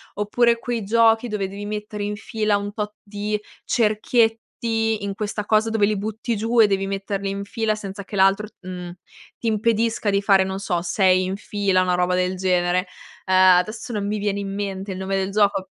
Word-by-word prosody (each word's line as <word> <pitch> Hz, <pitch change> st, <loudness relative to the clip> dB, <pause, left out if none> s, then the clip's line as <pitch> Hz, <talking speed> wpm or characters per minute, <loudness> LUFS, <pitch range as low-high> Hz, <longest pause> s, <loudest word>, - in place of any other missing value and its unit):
oppure 235 Hz, +3 st, +2 dB
quei 235 Hz, -2 st, -3 dB
giochi 225 Hz, +2 st, +3 dB
dove 210 Hz, -3 st, -2 dB
devi 200 Hz, +1 st, -7 dB
mettere 210 Hz, 0 st, -5 dB
in 205 Hz, 0 st, -2 dB
fila 215 Hz, 0 st, -1 dB
un 205 Hz, 0 st, -5 dB
tot 210 Hz, -1 st, -4 dB
di 210 Hz, +1 st, -3 dB, 0.3 s
cerchietti, 225 Hz, 0 st, +1 dB
in 200 Hz, -1 st, -2 dB
questa 210 Hz, 0 st, -3 dB
cosa 215 Hz, +1 st, +2 dB
dove 220 Hz, -2 st, +3 dB
li 210 Hz, 0 st, 0 dB
butti 220 Hz, +3 st, -3 dB
giù 230 Hz, +2 st, +3 dB
e 215 Hz, -, +7 dB
devi 195 Hz, -1 st, 0 dB
metterli 195 Hz, 0 st, -3 dB
in 200 Hz, 0 st, -3 dB
fila, 215 Hz, +1 st, -1 dB
senza 200 Hz, -1 st, -7 dB
che 205 Hz, -, -8 dB
l'altro, 195 Hz, +2 st, +3 dB
mhmm, 180 Hz, -1 st, -7 dB, 0.5 s
ti 235 Hz, -, -3 dB
impedisca 225 Hz, 0 st, +1 dB
di 200 Hz, 0 st, +2 dB
fare, 195 Hz, -1 st, +4 dB
non 190 Hz, 0 st, -4 dB
so, 180 Hz, -3 st, -1 dB
6 185 Hz, +1 st, +3 dB
in 185 Hz, +1 st, -2 dB
fila, 200 Hz, -2 st, 0 dB
una 180 Hz, -1 st, +1 dB
roba 180 Hz, 0 st, +1 dB
del 185 Hz, +1 st, 0 dB
genere. 180 Hz, 0 st, +1 dB, 0.4 s
Ehm, 185 Hz, -1 st, +6 dB
adesso 215 Hz, +6 st, -3 dB
non 205 Hz, -3 st, -2 dB
mi 210 Hz, +1 st, -1 dB
viene 205 Hz, -1 st, -1 dB
in 195 Hz, -1 st, -4 dB
mente 195 Hz, -1 st, -4 dB
il -, -, -7 dB
nome 190 Hz, +1 st, -2 dB
del 190 Hz, 0 st, -1 dB
gioco. 200 Hz, -2 st, +1 dB
205 Hz, 200 wpm, -22 LUFS, 195-215 Hz, 0.5 s, e